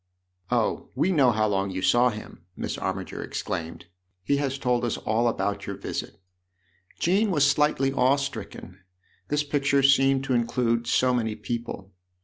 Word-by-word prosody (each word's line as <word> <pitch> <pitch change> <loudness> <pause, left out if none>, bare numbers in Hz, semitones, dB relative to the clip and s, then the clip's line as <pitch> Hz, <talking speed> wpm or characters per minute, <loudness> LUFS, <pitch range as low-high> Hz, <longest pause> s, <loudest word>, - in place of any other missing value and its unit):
" 90 0 -50
Oh, - - 0
we 190 - +2
know 140 -8 +4
how 110 -1 +1
long 100 -1 0
you 95 0 -4
saw 120 +4 +4
him! 105 -6 -9
" 90 - -45
Miss - - -3
Armiger - - -4
exclaimed. 80 0 -5 0.4
"He 140 +8 +1
has 140 -1 -1
told 125 -2 0
us 120 - -1
all 115 +2 0
about 100 -3 -2
your 100 - -4
visit." 100 - -5 0.8
Jean 200 +5 +2
was 150 -6 +3
slightly 140 -1 +2
awe 135 0 +4
stricken: 140 -9 -6 0.5
this 150 0 0
picture 140 -1 +1
seemed 135 0 +4
to 135 - -1
include 120 -1 0
so 130 0 +3
many 110 -3 -1
people. 110 -3 -5
125 Hz, 165 wpm, -26 LUFS, 105-140 Hz, 0.8 s, know